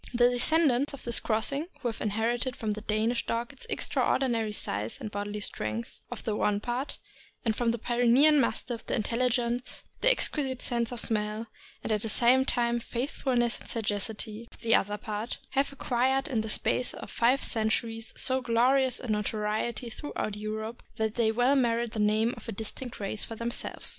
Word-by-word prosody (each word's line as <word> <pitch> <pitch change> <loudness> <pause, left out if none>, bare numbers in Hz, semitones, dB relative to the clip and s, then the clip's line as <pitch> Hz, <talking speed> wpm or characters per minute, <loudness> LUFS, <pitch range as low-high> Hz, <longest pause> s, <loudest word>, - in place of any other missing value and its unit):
The 240 +1 +5
descendants 280 +1 +2
of - - -13
this 235 - +3
crossing, 260 +8 0
who 250 - -1
have 225 - -6
inherited 230 +4 0
from 220 -2 -2
the 210 +1 -4
Danish 220 +3 0
dog 235 +4 -2
its 270 - -12
extraordinary 230 -5 +1
size 105 - -2
and 210 - -6
bodily 205 +1 -4
strength 110 - -4
of 245 - -7
the 215 - -1
one 205 -1 +1
part, 245 +5 -3 0.5
and 220 -2 +1
from 240 0 +1
the 235 - +1
Pyrenean 245 +6 +4
Mastiff 240 -3 -1
the - - 0
intelligence, 240 +1 -1 0.2
the - - +6
exquisite 275 - +1
sense 235 -2 0
of 245 - -3
smell, 215 0 0 0.4
and - - -2
at 210 -1 +1
the 225 - -2
same 245 +4 +4
time 240 -2 +1
the - - -12
faithfulness 245 -1 -1
and - - -13
sagacity, 215 +1 -3
of - - -17
the 230 -1 +3
other 205 -2 +3
part, 210 +2 -4
have 275 +1 +1
acquired 265 +1 +1
in 245 -7 0
the 220 - -4
space 250 +3 +1
of - - -9
five 250 +4 +2
centuries 225 0 +2
so 260 0 +2
glorious 250 +2 +3
a 250 - -7
notoriety 215 +2 -1
throughout 220 -6 -4
Europe 215 +2 -5
that 220 -1 -1
they 225 -2 +2
well 245 +5 +3
merit 235 -3 +1
the 220 - -4
name 215 +3 +2
of - - -9
a - - -1
distinct 225 +4 -5
race 205 +1 0
for 225 - -6
themselves. 235 +1 -2
235 Hz, 185 wpm, -29 LUFS, 215-250 Hz, 0.5 s, the